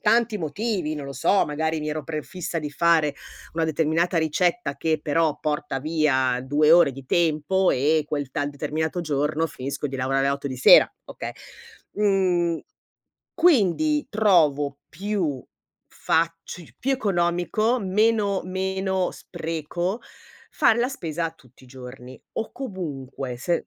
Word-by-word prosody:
tanti 230 -2 +2
motivi, 175 0 -2
non 145 -2 -6
lo 140 - -6
so, 170 +7 +2
magari 160 +2 -1
mi 150 - -3
ero 155 0 -3
prefissa 165 +3 -4
di 150 -2 -4
fare 155 -1 +2 0.4
una 165 0 +1
determinata 160 +3 +1
ricetta 165 +2 0
che 160 -2 0
però 155 0 +1
porta 150 -3 -2
via 135 -5 +1
2 150 +3 +3
ore 170 -4 +6
di 135 +1 -10
tempo 170 +3 +2
e 150 +4 +2
quel 145 -3 -3
tal 145 +2 -1
determinato 155 +4 -2
giorno 150 +1 0
finisco 140 0 -5
di 135 - -5
lavorare 135 +1 +1
alle 140 - +2
8 140 0 -5
di 130 - -5
sera, 125 - +7
okay. - - -7 0.6
Mhmm. 185 -5 +1 0.7
Quindi 300 - +3
trovo 155 -10 +3
più 175 -7 -2 0.5
faci 165 0 -2
più 265 - -1
economico, 200 +1 +1
meno 205 0 +1
meno 190 0 -1
spreco, 175 +4 -4 0.5
fare 225 - +3
la 245 +2 +2
spesa 165 - -3
tutti 130 -4 -21
i - - -17
giorni, 125 0 -11
o 225 - -4
comunque 140 - -6
se 170 +6 -1
160 Hz, 135 wpm, -24 LUFS, 145-190 Hz, 0.7 s, sera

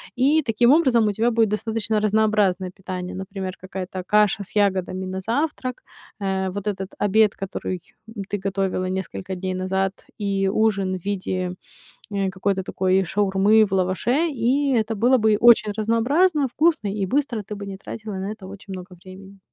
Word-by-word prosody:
И 280 +5 +3
таким 240 -1 +3
образом 260 -8 +4
у 210 - +2
тебя 225 +4 +1
будет 225 -3 +2
достаточно 220 0 -1
разнообразное 210 -4 +2
питание. 185 -1 -6
Например, 190 0 -5
какая-то 185 0 -6
каша 210 -1 +3
с 195 - -13
ягодами 190 -2 +1
на 190 0 -4
завтрак, 255 +2 -2 0.4
э, 190 -1 -1
вот 200 +2 -5
этот 195 -2 -4
обед, 210 0 +3
который 185 -1 -4 0.5
ты 205 - -2
готовила 190 -1 -1
несколько 190 0 -4
дней 185 +1 -3
назад, 190 +1 -2
и 195 -2 0
ужин 195 -3 +1
в 175 - -14
виде, 185 -2 -2 0.6
э, 195 -1 0
какой-то 190 0 -1
такой 190 +1 +1
шаурмы 200 +3 +3
в 200 - -10
лаваше, 190 - +1
и 270 +1 +1
это 225 -1 +1
было 245 +5 +4
бы 215 -2 +3
очень 230 -3 +6
разнообразно, 270 - +2
вкусно 310 -3 +1
и 200 -2 -1
быстро. 260 -1 0
Ты 210 - -7
бы 200 0 -7
не 195 -1 -6
тратила 215 +2 -7
на 190 +2 -4
это 215 -3 -9
очень 195 0 -9
много 180 0 -9
времени. 195 +1 -13
200 Hz, 165 wpm, -23 LUFS, 190-225 Hz, 0.6 s, очень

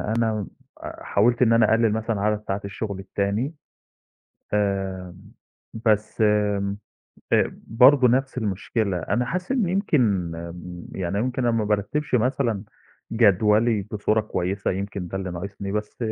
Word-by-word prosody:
أنا 110 -2 0 0.4
آآ - - -8
حاولت 120 +4 +2
إن 115 -2 +5
أنا 115 -2 +4
أقلِّل 115 -1 +3
مثلًا 110 -1 -1
عدد 105 +1 +1
ساعات 95 +1 -2
الشُغل 100 0 -5
التاني، 100 - -2 1.0
آآ 95 -3 -1 0.7
بس 110 0 +1
م 105 -2 +2 0.6
آآ - - +3
برضه 125 +3 +6
نَفْس 135 +2 +1
المشكلة. 105 -1 -1
أنا 120 +8 -1
حاسِس 180 - -3
إن 240 -9 +1
يمكن 125 - +1
م 85 +1 -8
يعني 95 +1 -2
يمكن 125 +3 -1
أنا 120 -1 +2
ما 110 - +1
بارتّبش 105 +8 -1
مثلًا 120 -3 +1 0.5
جدولي 110 0 +3
بصورة 105 +1 +1
كويسة، 100 -2 -2
يمكن 95 -1 -4
ده 95 - -4
اللي 95 -1 -4
ناقصني، 100 +3 -5
بس 105 0 -4
105 Hz, 140 wpm, -24 LUFS, 100-115 Hz, 1.0 s, برضه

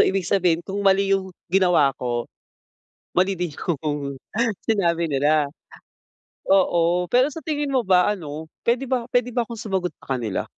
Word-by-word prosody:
ibig 190 -1 0
sabihin 175 -3 +1
kung 200 +1 -4
mali 195 0 +3
yung 190 -1 0 0.2
ginawa 180 -8 +4
ko, 120 -1 -1 0.9
mali 185 +1 +2
din 175 -4 -3
yung 145 -4 -3 0.5
sinabi 170 -6 +1
nila. 150 +1 +2 1.1
Oo, 175 -2 +3
pero 255 +7 +3
sa 325 - -7
tingin 295 -3 -2
mo 265 - +3
ba 185 +2 +4
ano, 160 -4 -6 0.2
puwede 245 +3 +2
ba 250 -2 -1
puwede 245 -1 0
ba 235 -1 -1
akong 230 -2 -7
sumagot 190 -5 -2
sa 135 - -2
kanila? 110 -5 -2
185 Hz, 155 wpm, -23 LUFS, 155-215 Hz, 1.1 s, ginawa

